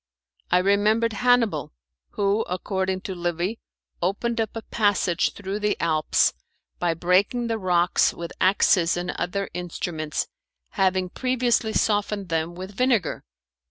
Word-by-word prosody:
I 180 - +4
remembered 210 +4 +2
Hannibal, 230 - +2 0.4
who, 200 +2 +1
according 190 +1 -2
to 190 - -5
Livy, 175 +4 -2 0.4
opened 225 +6 0
up 220 0 -3
a 225 - -5
passage 205 -5 +1
through 200 +1 -5
the 210 0 0
Alps 155 -2 +2 0.5
by 170 -2 +1
breaking 190 +8 +2
the 225 -1 -1
rocks 180 -2 +3
with 170 0 -7
axes 185 -2 +3
and 175 0 -2
other 195 +3 -3
instruments, 165 -3 -3 0.4
having 190 -2 +1
previously 245 -2 0
softened 205 -3 0
them 165 +1 -1
with 185 +2 -7
vinegar. 245 - +1
190 Hz, 125 wpm, -24 LUFS, 175-220 Hz, 0.5 s, I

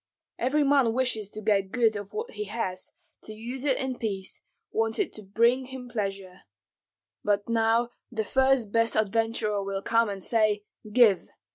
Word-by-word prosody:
Every 280 +5 +2
man 275 -5 +4
wishes 235 -5 0
to 215 - -8
get 195 -2 +2
good 225 -1 +2
of 205 -1 -6
what 450 +3 -4
he 210 - -5
has, 195 -3 -4 0.3
to 215 - -9
use 240 +4 -6
it 275 -3 +2
in 260 -1 -3
peace, 195 -4 -4 0.3
wants 225 0 0
it - - -1
to 215 - -7
bring 235 +6 +2
him 260 -1 -8
pleasure. 195 -5 -4 0.8
But 205 -1 +1
now 230 +1 +2 0.2
the 220 -2 -1
first 265 -2 +2
best 230 -1 +2
adventurer 215 -1 0
will 195 0 -3
come 230 -1 +2
and 195 -2 -5
say, 215 -3 +2 0.3
'Give.' 210 -5 +4
225 Hz, 165 wpm, -27 LUFS, 205-245 Hz, 0.8 s, man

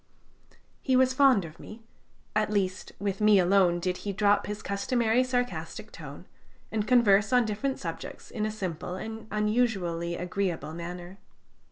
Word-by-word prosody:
He 260 - +1
was 260 0 +4
fond 260 -8 +5
of 155 0 -12
me; 225 +1 -11 0.5
at 215 0 +2
least, 190 -3 -1
with 200 0 -3
me 210 -1 +6
alone 180 -1 +4
did 180 +1 -1
he 205 - -4
drop 205 +1 +2
his 210 0 -5
customary 230 +4 +1
sarcastic 245 -1 -3
tone, - - -10 0.5
and 215 -1 -1
converse 215 -4 +4
on 250 -2 +4
different 220 +6 -2
subjects - - -7
in 215 - -3
a 215 - 0
simple 180 -4 -4
and 220 +3 -7
unusually 210 -6 0
agreeable 180 -3 -3
manner. 175 +3 -7
205 Hz, 150 wpm, -28 LUFS, 185-225 Hz, 0.5 s, me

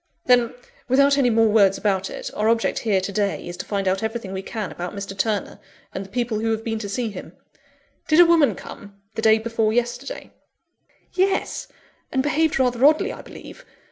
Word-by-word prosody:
"Then, 245 -2 +3 0.3
without 275 +2 +4
any 250 -3 +4
more 225 -1 +4
words 200 -3 +4
about 195 -2 0
it, - - -6
our 215 +1 +1
object 230 0 +1
here, 210 -4 +1
to 190 +2 -4
day, 200 -2 -1
is 175 - -6
to 190 - -7
find 200 -2 -2
out 190 +1 +1
everything 220 -3 -4
we 190 - -3
can 210 +1 -5
about 175 +3 -6
Mr. 200 -1 -6
Turner, 205 +1 -2 0.3
and 190 - -4
the 195 - -13
people 235 -1 -2
who 225 +1 -1
have 225 0 -1
been 225 -1 -2
to 205 -2 -5
see 230 +3 -2
him. 190 - -9 0.7
Did 310 +1 +4
a 350 - +10
woman 330 -4 +4
come, 200 0 -11
the 225 - -3
day 220 0 +5
before 225 -1 0
yesterday?" 240 - -3 0.8
"Yes; 380 +2 0 0.4
and 260 -1 +1
behaved 310 +2 +1
rather 250 -2 +1
oddly, 310 - +4
I - - -9
believe. - - -12
225 Hz, 200 wpm, -22 LUFS, 200-250 Hz, 0.8 s, a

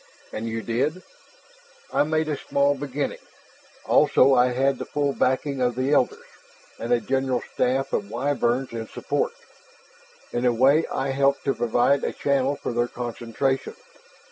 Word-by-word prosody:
"And 110 +1 -4
you 115 0 -4
did?" 150 +10 -1 0.9
"I - - +3
made 155 +1 +1
a 150 - -1
small 140 +1 +1
beginning. 140 0 -4 0.7
Also 135 +1 +5
I 125 -1 +5
had 135 +2 +1
the - - -4
full 145 -1 -1
backing 130 +1 0
of 125 -1 +1
the 130 +2 0
Elders, 140 -4 +1 0.5
and 115 - -4
a 120 - +4
general 130 +1 -1
staff 130 +2 0
of 100 - -1
Wyverns 125 +1 0
in 115 -1 -5
support. - - -2 1.0
In 120 - -2
a 125 - +4
way 135 +7 +4
I 135 - -1
helped 140 +1 +1
to 135 - +2
provide 120 +4 +2
a - - -1
channel 140 0 +1
for 125 - -5
their 120 +1 +1
concentration. 120 +2 -3
130 Hz, 155 wpm, -24 LUFS, 120-140 Hz, 1.0 s, Also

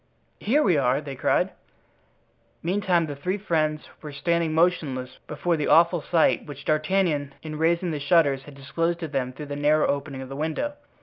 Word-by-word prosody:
"Here 285 +8 +2
we 175 -6 +3
are!" 130 0 +2
they 145 -2 -7
cried. - - +1 1.1
Meantime 180 -1 +1
the 145 -2 -6
three 180 +8 -2
friends 155 -6 -1
were 150 - -7
standing 165 +3 0
motionless 150 -7 0
before 165 +3 -1
the 150 - -1
awful 170 0 +5
sight 165 +1 +2
which 140 -1 -9
D'Artagnan, 155 -2 0
in 155 -1 -6
raising 170 +2 +1
the 150 - -3
shutters, 140 -2 +3
had 145 - -12
disclosed 165 +5 -2
to 165 - -3
them 135 -4 -2
through 150 +4 -8
the 145 0 -5
narrow 150 +1 +3
opening 140 -1 -2
of 130 - -10
the 135 - -6
window. 160 - -2
155 Hz, 180 wpm, -25 LUFS, 140-170 Hz, 1.1 s, awful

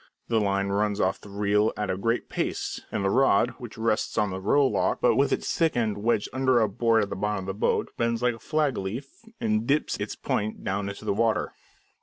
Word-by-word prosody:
The 115 -2 +2
line 100 -1 0
runs 105 +1 0
off - - 0
the 105 - -12
reel 105 +1 +2
at 105 -1 -1
a - - -1
great 115 +5 -1
pace, - - -3
and 100 - -1
the 95 - +2
rod, 125 -2 +4
which 120 -3 -9
rests 110 -1 0
on 105 -2 +2
the 95 +1 -5
row 140 +8 +3
lock, 130 - +1
but - - +3
with - - +2
its - - -1
thick 165 -6 +1
end 110 -4 0
wedged 110 -1 +1
under 130 -2 +3
a 110 - +3
board 115 +2 +2
at 100 - -5
the - - -2
bottom 105 -1 -2
of - - -8
the 95 - -3
boat, 100 - 0
bends 115 0 0
like 125 -1 +3
a 115 - -11
flag 150 0 0
leaf 120 - -6 0.2
and 110 +1 0
dips 145 +2 +1
its - - -4
point 105 +1 -2
down 100 +1 -2
into 100 - -8
the - - +1
water. 110 0 0
110 Hz, 235 wpm, -26 LUFS, 100-120 Hz, 0.2 s, rod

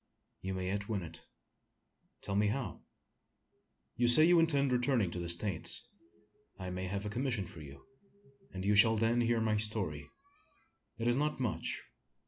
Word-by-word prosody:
"You 95 0 -4
may 95 0 -4
yet 100 +2 -4
win 100 -4 -2
it." 80 -1 -12 0.9
"Tell 100 - -4
me 105 +1 +2
how." 110 -3 -4 1.1
"You 120 +1 +1
say 140 +6 +10
you 175 0 +5
intend 140 -5 +2
returning 125 -6 +1
to 90 - -5
the 85 -1 -5
States. 85 0 +1 0.7
I 95 -1 -6
may 90 +1 -4
have 100 +2 -4
a - - -3
commission 120 -4 -2
for 80 - -12
you; 70 -2 -13 0.7
and 95 0 -6
you 105 - +2
shall 110 +2 +5
then 115 +2 +1
hear 120 0 +1
my 110 -1 0
story. 95 -9 -2 0.9
It 115 - -4
is 120 +1 +2
not 150 0 -1
much. 125 -4 -3
105 Hz, 165 wpm, -32 LUFS, 95-120 Hz, 1.1 s, say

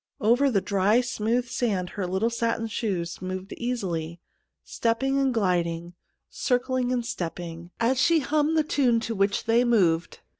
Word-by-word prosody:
Over 245 +6 +3
the 205 -6 +1
dry, 200 +4 +2
smooth 245 0 -1
sand 200 -8 -1
her 190 -3 -3
little 190 +6 0
satin 230 -1 -1
shoes 195 -7 -3
moved 185 +1 -5
easily, 175 -9 -3 0.4
step 230 +1 -1
ping 270 +1 +1
and 270 -1 +2
gliding, 175 -5 -1 0.3
circling 255 0 0
and 245 -2 -1
step 185 -9 -4
ping, 170 -1 -8
as 250 +3 +2
she 335 -1 +4
hummed 305 +3 +1
the 310 - +4
tune 255 -6 +2
to 230 - -3
which 200 -1 +1
they 230 +2 +3
moved. 180 -9 +1
230 Hz, 160 wpm, -26 LUFS, 185-250 Hz, 0.4 s, she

